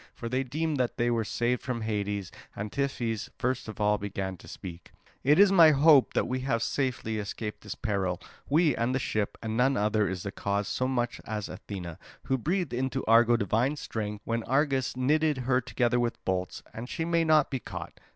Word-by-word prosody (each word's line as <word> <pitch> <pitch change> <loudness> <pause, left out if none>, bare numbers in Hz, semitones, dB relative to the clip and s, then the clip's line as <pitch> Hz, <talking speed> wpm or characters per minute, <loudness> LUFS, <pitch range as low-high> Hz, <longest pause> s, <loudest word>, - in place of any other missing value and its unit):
For 115 - -6
they 130 +3 0
deemed 150 +4 -2
that 125 -2 -1
they 120 0 +2
were 115 -1 +1
saved 120 +3 0
from 125 -3 -3
Hades; 105 -3 -2 0.2
and 105 +1 -5
Tiphys 120 -6 -2
first 130 0 -1
of 110 - -8
all 105 0 +2
began 95 -1 -4
to - - -15
speak: 85 -2 -9 0.3
"It 145 +3 +5
is 200 0 +7
my 170 -5 +8
hope 145 -1 +5
that - - +2
we 130 +1 -1
have 125 -3 0
safely 125 -5 -1
escaped 105 +1 -5
this 105 - -6
peril—we, 105 - 0
and 120 +3 0
the - - +1
ship; 110 -5 -2
and 110 0 -2
none 130 +3 +3
other 105 -1 +2
is 95 -2 -4
the 100 - -4
cause 100 +1 -2
so 130 - -1
much 120 -2 -1
as 105 -2 -3
Athena, 90 -5 -7 0.2
who 130 -1 0
breathed 175 0 -1
into 130 +2 -1
Argo 120 +1 +5
divine 115 +7 +1
strength 105 -6 -5
when 115 0 -1
Argus 135 -2 +1
knitted 150 +3 +2
her 130 0 +3
together 125 -1 +1
with 120 -1 -2
bolts; 95 -1 -2
and 120 +3 -7
she 165 - -2
may 170 0 +2
not 155 -2 +4
be 135 - -1
caught. - - -8
120 Hz, 200 wpm, -28 LUFS, 105-135 Hz, 0.3 s, my